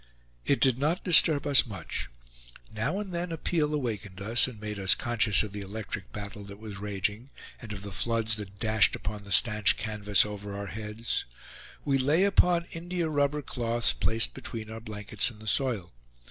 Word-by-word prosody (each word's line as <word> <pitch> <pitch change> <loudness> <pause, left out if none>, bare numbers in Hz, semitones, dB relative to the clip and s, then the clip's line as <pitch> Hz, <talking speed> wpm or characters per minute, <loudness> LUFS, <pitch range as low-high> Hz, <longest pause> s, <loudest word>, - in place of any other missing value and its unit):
It 140 - +2
did 130 -2 +3
not 155 +6 0
disturb 155 -4 +6
us 140 -3 +6
much. 95 -7 -5 0.6
Now 110 - -1
and 200 -3 -6
then 170 0 -3
a 165 - -4
peal 150 -2 0
awakened 110 -10 -4
us, 110 +6 +3
and 120 -5 -9
made 105 -1 -5
us 95 -1 +5
conscious 115 -3 +2
of 105 - -6
the 105 - -5
electric 100 0 -6
battle 105 0 -6
that 100 0 -10
was 105 -2 -8
raging, 105 +4 -3 0.3
and 115 -4 -9
of 100 -1 -7
the 100 - -7
floods 115 +2 0
that 100 -2 -8
dashed 110 -4 +3
upon 105 +1 -6
the 100 - -10
stanch 105 0 +5
canvas 105 -2 +2
over 105 -1 -6
our 100 - -5
heads. 110 +2 -4 0.6
We 135 -1 +2
lay 150 +8 +3
upon 180 -3 +3
india 170 0 -3
rubber 145 0 0
cloths, 120 -2 0
placed 115 +1 +1
between 110 -1 -7
our 115 0 -7
blankets 105 -1 -2
and 110 -3 -14
the 110 - -12
soil. 110 - 0
110 Hz, 185 wpm, -28 LUFS, 105-135 Hz, 0.6 s, disturb